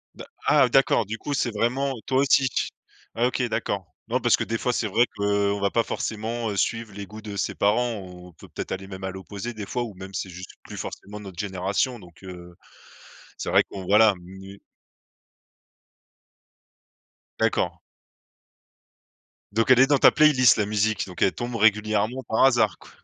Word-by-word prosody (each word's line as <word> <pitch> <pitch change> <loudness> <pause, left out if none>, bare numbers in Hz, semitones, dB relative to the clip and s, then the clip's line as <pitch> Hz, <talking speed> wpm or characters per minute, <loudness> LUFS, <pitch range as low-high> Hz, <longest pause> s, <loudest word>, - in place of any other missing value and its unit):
D'a - - -9 0.2
ah, 125 - +5
d'accord, 120 -3 +3
du 110 +3 -5
coup, 145 - -4
c'est 120 -4 0
vraiment 130 +6 0
toi 130 -1 +1
aussi. 135 -1 +4 0.7
OK 125 +2 +1
d'accord. 100 -6 -3
Non, - - 0
parce - - +3
que, - - -1
des 115 - -2
fois, 125 - 0
c'est 115 -2 -1
vrai 115 +5 +3
qu'on 100 0 +1
va 100 0 0
pas 115 - +2
forcément, 115 +1 -3
heu, - - -4
suivre 110 +3 -1
les 100 0 -7
goûts 110 +2 -10
de 105 -2 -7
ses 100 - -2
parents, 115 +3 +1
on 90 -1 -12
peut - - -15
peut-être - - -7
aller 95 +1 -4
même 95 -1 -9
à 95 - -2
l'opposé, 95 +5 -7
des 105 -2 -6
fois, 125 - -3
ou 115 -4 -7
même, 95 +1 -10
c'est 95 - -4
juste 90 +1 -9
plus - - -10
forcément 105 +1 -7
notre 95 -4 -10
génération 100 +6 -1
donc 90 +1 -17
heu, 90 -1 -10 0.8
c'est - - -5
vrai - - +5
qu'on 95 -2 -8
voilà. 105 +2 +5
Mmh, 90 0 -15 0.2
n 95 - -10
oui. 100 - -15 2.8
D'accord. - - 0 1.7
Donc 115 +3 0
elle 130 - +7
est 135 - +8
dans 145 - +4
ta - - +8
playlist 140 -7 +5
la 105 - +1
musique, 110 +1 0
donc 90 - -10
elle 95 - +4
tombe 120 0 -5
régulièrement 110 +3 +2
par 110 - +1
hasard 120 -6 +3
qu - - -16
105 Hz, 185 wpm, -25 LUFS, 95-120 Hz, 2.8 s, est